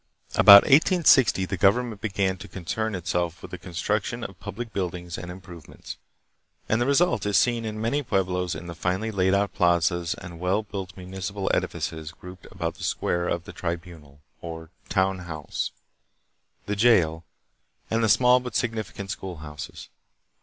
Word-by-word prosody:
About 100 0 +10
1860 140 - +5
the 95 0 -4
government 105 +3 +2
began 100 -3 0
to - - -10
concern 95 +5 -3
itself 85 -1 -2
with - - -9
the 90 - -6
construction 105 +6 -2
of 95 -4 -8
public 110 +3 -7
buildings 90 -2 -4
and 90 - -7
improve 90 -3 -11
ments, - - -10 0.7
and 110 +2 +1
the 120 - +1
result 140 - +2
is 105 - +3
seen 120 -2 +2
in 110 -1 -4
many 115 +7 0
pueblos 90 -6 -1
in - - -8
the 85 - -6
finely 95 +6 -2
laid 95 -1 +2
out 100 0 0
plazas 85 -1 +2
and 85 -1 -10
well 95 +4 0
built 95 -3 -7
municipal 95 +2 -4
edifices 80 -1 -2
grouped 90 +1 -12
about - - -4
the - - -7
square 85 0 -1
the 85 - -12
"tribunal," 85 -5 -6 0.2
or 80 -1 -8 0.2
town 95 -1 +1
house, 80 -4 -4 1.0
the 105 - -2
jail, 90 -8 +3 0.7
and 115 +1 +1
the 110 - +3
small 125 +3 +5
but 125 -3 -7
significant 110 -4 -3
schoolhouses. 80 -6 -8
95 Hz, 155 wpm, -25 LUFS, 85-110 Hz, 1.0 s, About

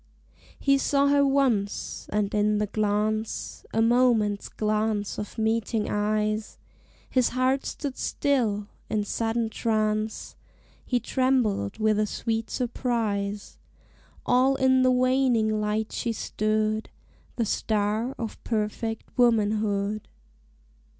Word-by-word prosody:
He 275 0 +3
saw 280 +1 +2
her 285 0 +4
once, 265 -8 0
and 210 -1 0
in 210 0 +2
the 210 - +1
glance, 215 +1 -2
A 225 - +2
moment's 230 -4 +2
glance 215 -1 -1
of 210 - -7
meeting 220 0 0
eyes, 215 +1 -1 0.5
His 255 -2 +2
heart 255 +2 +1
stood 280 -3 -5
still 225 -8 0 0.2
in 210 -1 0
sudden 225 +2 -1
trance: 215 -1 -1 0.5
He 245 - +1
trembled 240 - 0
with 215 -1 +2
a 215 - +1
sweet 225 +1 -2
surprise 220 -5 -2 0.7
All 255 +2 +4
in 260 -1 +3
the 255 - +4
waning 250 -4 +2
light 210 +1 -1
she 235 - -2
stood, 215 0 -1 0.5
The 230 - 0
star 215 +4 0
of 225 -2 -6
perfect 225 0 -2 0.2
womanhood. 215 -3 +2
220 Hz, 110 wpm, -26 LUFS, 210-250 Hz, 0.7 s, her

